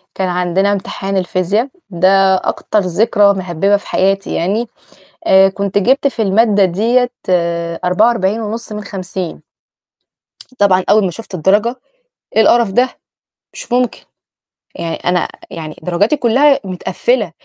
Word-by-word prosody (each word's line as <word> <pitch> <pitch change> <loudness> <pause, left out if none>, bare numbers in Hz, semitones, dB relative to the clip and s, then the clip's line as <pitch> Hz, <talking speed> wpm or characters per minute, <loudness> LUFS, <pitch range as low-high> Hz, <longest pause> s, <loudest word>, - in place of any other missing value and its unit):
كان 190 -1 -1
عندنا 180 +3 0
امتحان 195 0 -3
الفيزيا 190 +7 0 0.2
ده 190 +2 +3
أكتر 210 +3 -1
ذكرى 200 +2 +2
مهبِّبة 190 +2 0
في - - -14
حياتي 195 +1 0
يعني، 210 +7 -1 0.6
آآ 190 0 +6
كنت 200 0 -3
جِبت 265 +7 +2
في 245 -4 -3
المادة 205 0 +3
ديّة 235 +7 +1 0.8
44.5 220 +3 0
من 210 0 -5
50. 185 -3 -6 1.2
طبعًا 190 -2 +3
أول 210 -1 +4
ما 180 - 0
شُفت 220 +1 -10
الدرجة، 205 +8 +1 0.6
إيه 220 - +5
القرف 230 -1 +3
ده؟ 250 +5 +2 0.6
مش - - -9
ممكن. 250 -1 0 0.8
يعني 165 -1 -4
أنا 180 -1 -1 0.2
يعني 155 -2 -7
درجاتي 200 - +1
كُلّها 275 +4 +3
مِتقفِّلة، 190 +3 -1
200 Hz, 125 wpm, -15 LUFS, 185-225 Hz, 1.2 s, آآ